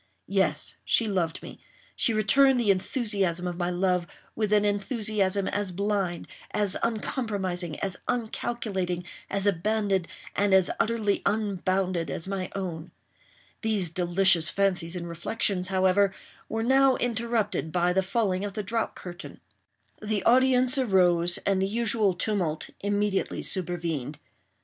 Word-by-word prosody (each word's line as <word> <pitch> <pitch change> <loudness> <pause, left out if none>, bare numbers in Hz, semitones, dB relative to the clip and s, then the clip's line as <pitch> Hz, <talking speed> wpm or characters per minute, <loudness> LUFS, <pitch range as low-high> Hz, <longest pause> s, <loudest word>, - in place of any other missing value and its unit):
Yes, - - -1
she 230 - +2
loved 175 -5 -1
me—she - - -3
returned 250 +5 +4
the 220 -4 +3
enthusiasm 195 -4 -1
of 175 -1 -3
my 175 -1 -1
love, 180 -1 0 0.3
with 215 -2 -1
an 210 0 +4
enthusiasm 205 -2 0
as 205 -2 -2
blind—as 200 +1 -1
uncompromising—as 195 - -2
uncalculating—as 200 -5 -3
abandoned—and 200 0 0
as 190 -2 +4
utterly 220 -3 +1
unbounded 185 -5 0
as 165 +6 -4
my 190 -2 -3
own! 175 -3 -5 0.7
These 210 -7 0
delicious 175 -1 +3
fancies 185 -4 0
and 170 -1 -5
reflections, 180 +2 -1
however, 190 +1 +3 0.4
were 225 +1 -2
now 265 +2 +4
interrupted 230 -7 -1
by 175 +1 +1
the 190 - +3
falling 190 -1 -1
of 205 -1 -5
the 210 - -3
drop 225 +3 -2
curtain. 175 -1 -9 0.6
The 215 -1 -2
audience 255 +1 +4
arose; 175 -7 +4
and 195 -1 +2
the 190 - +1
usual 215 -3 +2
tumult 175 -6 -2
immediately 205 -1 -1
supervened. 165 -6 -3
195 Hz, 120 wpm, -27 LUFS, 180-215 Hz, 0.7 s, returned